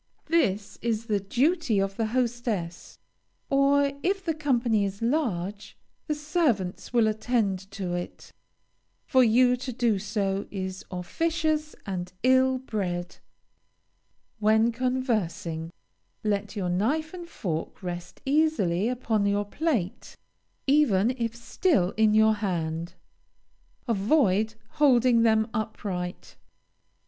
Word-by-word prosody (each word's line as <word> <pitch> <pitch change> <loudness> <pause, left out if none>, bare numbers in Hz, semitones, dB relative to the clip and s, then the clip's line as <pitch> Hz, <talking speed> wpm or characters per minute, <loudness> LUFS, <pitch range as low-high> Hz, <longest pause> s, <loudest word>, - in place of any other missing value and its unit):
This 205 - +1
is 230 -1 -1
the 210 -3 +1
duty 255 - +1
of 195 0 -1
the 225 +1 -1
hostess, 230 -7 -2 0.5
or, 280 0 +3
if 385 +1 -1
the 325 - +1
company 245 -8 +1
is 200 0 -3
large, 210 - -2 0.3
the 305 - 0
servants 295 - -1
will 235 -2 +4
attend 215 -3 -1
to 195 -3 -4
it. 175 0 -6 0.7
For 260 -3 +4
you 250 +2 +4
to 255 +1 -5
do 235 -4 +1
so 200 -1 -2
is 190 0 -5
officious 310 - -1
and 180 -2 -4
ill 260 0 +4
bred. 180 -8 -4 1.2
When 220 +2 +4
conversing 220 -10 -2 0.5
let 205 0 -1
your 190 -4 -2
knife 280 - 0
and 350 -2 -8
fork 165 - -4
rest 175 0 -6
easily 270 - +2
upon 225 -5 0
your 205 0 +1
plate, 230 - -2 0.5
even 255 -7 +3
if 235 -3 -3
still 235 - +1
in 215 -1 +4
your 220 0 +5
hand. 170 -5 -3 0.9
Avoid 220 -1 +2
holding 255 -5 +4
them 220 -1 +3
upright. 195 -5 -4
220 Hz, 115 wpm, -27 LUFS, 195-260 Hz, 1.2 s, your